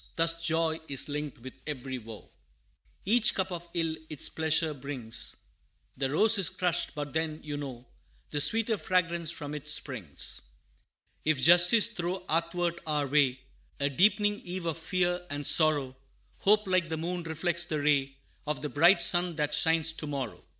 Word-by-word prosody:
Thus 165 0 +1
joy 165 -1 0
is 140 +1 -1
linked 150 -1 -4
with 130 - -8
every 130 -3 -4
woe 110 -2 -12 0.7
Each 235 +4 +3
cup 190 -1 -1
of 175 -1 -6
ill 165 -2 0
its 155 -3 0
pleasure 160 0 0
brings; 130 -5 -5 0.6
The 135 0 -1
rose 215 +9 +6
is 185 - +3
crushed, 180 -2 -1
but 145 -2 -5
then, 160 -1 -1
you 150 -1 -5
know, 130 -4 -7 0.5
The 145 - +2
sweeter 225 +5 +3
fragrance 170 -3 0
from 150 -3 -5
it 150 0 -7
springs. 125 - -3 0.8
If 155 -3 +1
justice 175 - +5
throw 180 -3 -4
athwart 170 +1 -1
our 150 -2 0
way, 135 -2 +2 0.4
A 140 0 0
deepening 205 +6 +3
eve 180 0 -6
of 165 -1 -2
fear 180 +1 0
and 145 0 -4
sorrow, 145 -5 +2 0.4
Hope, 210 +2 +4
like 185 -3 +1
the 160 - -2
moon, 175 +2 -3
reflects 170 +1 -2
the 155 -3 -2
ray 140 -2 +1 0.3
Of 150 0 -3
the 150 - -2
bright 170 +8 +5
sun 175 -1 +2
that 150 -1 -1
shines 160 +1 +2
to 160 -1 -6
morrow. 135 -6 -5
160 Hz, 165 wpm, -29 LUFS, 145-175 Hz, 0.8 s, rose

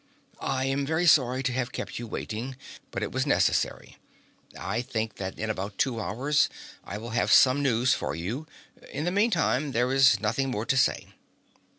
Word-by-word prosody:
"I 130 0 -1
am 135 +1 0
very 160 +5 0
sorry 130 -5 +4
to 125 - 0
have 125 -1 -2
kept - - -5
you 120 - -6
waiting, 115 +4 -5 0.3
but - - -4
it - - -3
was - - -1
necessary. - - +1 0.6
I 110 +5 -2
think 110 -2 -4
that 95 -1 -5
in 110 0 -2
about 100 0 -5
two 125 -4 0
hours 130 +9 +1 0.3
I 100 - -6
will 115 +2 -7
have 115 - +1
some 130 +2 +6
news 125 -2 +2
for - - -3
you. 110 - -4 0.4
In 145 - -3
the 175 - 0
meantime 175 - +1
there 125 +2 +1
is 135 -1 +5
nothing 115 +6 0
more 110 -3 -2
to 140 +1 +1
say." 125 - +1
125 Hz, 185 wpm, -27 LUFS, 110-135 Hz, 0.6 s, some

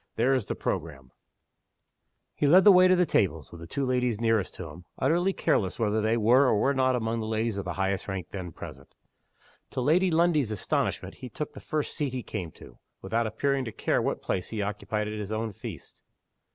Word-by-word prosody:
There 125 +4 +3
is 125 -7 0
the - - -2
programme!" 65 -2 -4 1.2
He 145 - +1
led 180 +6 +7
the 205 - +9
way 185 -1 +7
to 185 - +5
the 180 0 +3
tables, 80 - 0
with 85 - -11
the 85 - -8
two 135 +9 -2
ladies 125 -3 0
nearest 115 -4 +1
to 90 - -7
him 85 +4 -12
utterly 175 +7 +2
careless 95 - 0
whether 110 -1 +1
they 110 +2 +2
were 125 +5 +5
or 110 - +3
were 140 +6 +2
not 130 -1 +2
among 115 -1 -1
the 110 - -3
ladies 110 0 -1
of 100 - -4
the - - -3
highest 95 0 -1
rank 95 -4 -4
then 90 -3 -6
present. - - -11 0.7
To - - -4
Lady 165 +9 +3
Lundie's 160 -6 +2
astonishment 105 -3 -2
he 130 - -6
took 150 +6 -5
the - - -9
first 155 -2 -3
seat 145 -5 -2
he 125 -2 -3
came 90 -3 -5
to, - - -15 0.2
without 115 +4 0
appearing 140 +5 0
to 110 - -5
care - - 0
what - - -2
place 90 - -2
he 110 - -4
occupied 105 +1 -2
at 105 0 -4
his 105 0 -5
own 110 0 -2
feast. - - -9
115 Hz, 215 wpm, -27 LUFS, 100-140 Hz, 1.2 s, the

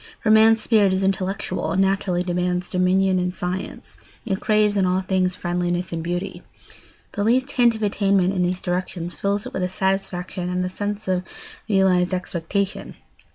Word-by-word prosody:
For 215 - +3
man's 220 +1 +6
spirit 205 -4 +3
is 190 +1 0
intellectual 190 0 -1
and 190 - 0
naturally 190 -2 +1
demands 180 0 -1
dominion 185 +1 +2
and 180 0 -1
science; 180 +1 -6 0.3
it 195 -4 -1
craves 210 -1 +2
in 190 -2 +2
all 185 +1 +1
things 185 -1 0
friendliness 175 0 -2
and 165 - -2
beauty. 175 +3 -4 0.7
The 205 - -2
least 255 +5 +2
hint 240 -3 +3
of 220 - -5
attainment 195 -2 +2
in 185 - 0
these 180 +1 -1
directions 175 -1 -3
fills 200 +1 -1
it - - -8
with 180 -1 -2
satisfaction 185 -2 -2
and 180 0 -1
the - - -2
sense 205 +2 -4
of 185 -1 +1 0.5
realised 185 -2 +3
expectation. 185 +2 -3
190 Hz, 165 wpm, -22 LUFS, 180-200 Hz, 0.7 s, man's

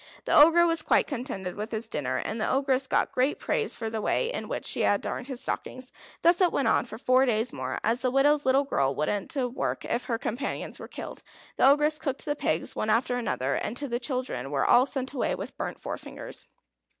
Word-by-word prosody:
The - - +2
Ogre 330 +3 +7
was 330 -1 +2
quite - - +3
contented 235 - -4
with 210 +3 -5
his 220 0 -3
dinner, 130 - -2
and 220 +1 -3
the - - 0
Ogress 265 -1 +1
got - - +1
great 260 +3 +1
praise 450 -3 -1
for 225 - -4
the 220 0 -3
way 485 - 0
in - - -4
which - - -4
she - - 0
had 205 - +3
darned 250 - -4
his 260 -3 -4
stockings. 255 0 -4 0.3
Thus 345 +2 +5
it 360 - +4
went 275 - 0
on - - +3
for 220 - -8
four 255 +2 +3
days 225 0 0
more. 130 -1 -4
As 230 +3 +1
the 255 - 0
widow's 285 +3 +3
little 265 +2 +3
girl 135 - 0
wouldn't 195 - -2
work 255 -2 -2
if 240 - -2
her 235 -3 -1
companions 240 +4 -4
were - - -8
killed, - - -8 0.3
the - - +5
Ogress 300 +2 +3
cooked 275 -3 -3
the 290 - -1
pigs 160 - -1
one 215 - -2
after 240 +3 +2
another, 140 - -1
and 235 - -2
the 260 -4 -2
children 250 - -3
were 140 -1 0
all 250 +3 +5
sent 265 -1 -3
away 265 - 0
with - - -7
burnt - - -5
forefingers. - - -7
255 Hz, 220 wpm, -27 LUFS, 220-280 Hz, 0.3 s, Ogre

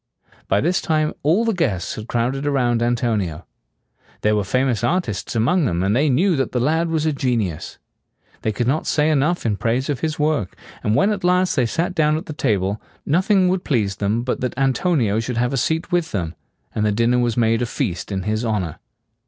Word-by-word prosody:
By 100 - +2
this 175 +4 +1
time 155 -2 0
all 175 +11 +2
the 225 - +1
guests 120 - -1
had 110 +1 -7
crowded 130 +5 -1
around 120 -4 +1
Antonio. 110 -9 -1 0.8
There 105 0 +2
were 105 - +1
famous 120 +2 0
artists 120 - -1
among 145 +10 +2
them, 90 -6 0
and 100 +3 +1
they 145 +4 +3
knew 175 +8 +3
that 135 - -1
the 125 - +1
lad 160 +6 +1
was 160 -1 0
a 155 - +1
genius. 115 - -2 0.6
They 110 - 0
could 120 +3 -2
not 140 +6 0
say 150 +1 +2
enough 155 +3 +1
in 105 -3 +1
praise 125 +7 0
of 135 - -3
his 160 +2 -2
work; 150 - 0 0.3
and 105 - +1
when 200 - +3
at 205 -3 -3
last 180 +1 +2
they 125 -3 +2
sat 170 +9 -1
down 155 -2 +2
at 160 - -6
the 155 - -6
table, 105 -7 0 0.2
nothing 185 +4 +3
would 185 0 0
please 105 -8 0
them 105 +4 0
but 125 - -2
that 125 -2 -3
Antonio 135 - +1
should 115 +1 -3
have 125 +2 +1
a - - +1
seat 160 +7 -1
with 175 -2 0
them; 85 -5 -2 0.4
and 105 - -1
the 105 - +2
dinner 115 +3 +2
was 120 -2 0
made 115 0 +2
a 120 - 0
feast 105 -7 -3
in 95 -1 -2
his 110 +3 -1
honor. 105 -8 -2
125 Hz, 210 wpm, -21 LUFS, 110-155 Hz, 0.8 s, they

